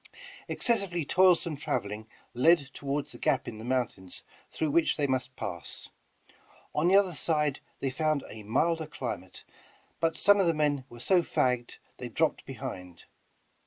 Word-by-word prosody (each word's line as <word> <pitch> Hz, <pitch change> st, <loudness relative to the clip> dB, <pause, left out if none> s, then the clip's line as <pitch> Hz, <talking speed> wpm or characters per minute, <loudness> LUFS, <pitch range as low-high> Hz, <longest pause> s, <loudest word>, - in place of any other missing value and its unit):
Excessively 195 Hz, -, 0 dB
toilsome 180 Hz, -2 st, +4 dB
traveling 110 Hz, -5 st, -3 dB, 0.3 s
led 140 Hz, +2 st, +4 dB
toward 140 Hz, +1 st, -2 dB
the 120 Hz, -, -11 dB
gap -, -, +1 dB
in 110 Hz, -, -6 dB
the -, -, -8 dB
mountains 120 Hz, -7 st, -2 dB, 0.3 s
through 155 Hz, -2 st, -1 dB
which 165 Hz, +2 st, +3 dB
they 145 Hz, -, +1 dB
must 130 Hz, -2 st, -1 dB
pass. -, -, -6 dB, 0.8 s
On 150 Hz, +3 st, +2 dB
the 190 Hz, -, +5 dB
other 195 Hz, -3 st, +4 dB
side 150 Hz, -3 st, 0 dB, 0.2 s
they 135 Hz, -, 0 dB
found 155 Hz, +1 st, 0 dB
a 110 Hz, -, -9 dB
milder 160 Hz, +9 st, +1 dB
climate, 120 Hz, -11 st, -6 dB, 0.6 s
but 165 Hz, -1 st, +1 dB
some 205 Hz, 0 st, +5 dB
of 190 Hz, -, +3 dB
the 165 Hz, -, +2 dB
men 145 Hz, -3 st, +1 dB
were 120 Hz, -, -11 dB
so 180 Hz, +8 st, +4 dB
fagged, 125 Hz, -6 st, 0 dB, 0.2 s
they -, -, -6 dB
dropped -, -, 0 dB
behind. 90 Hz, -2 st, -7 dB
145 Hz, 155 wpm, -29 LUFS, 120-165 Hz, 0.8 s, the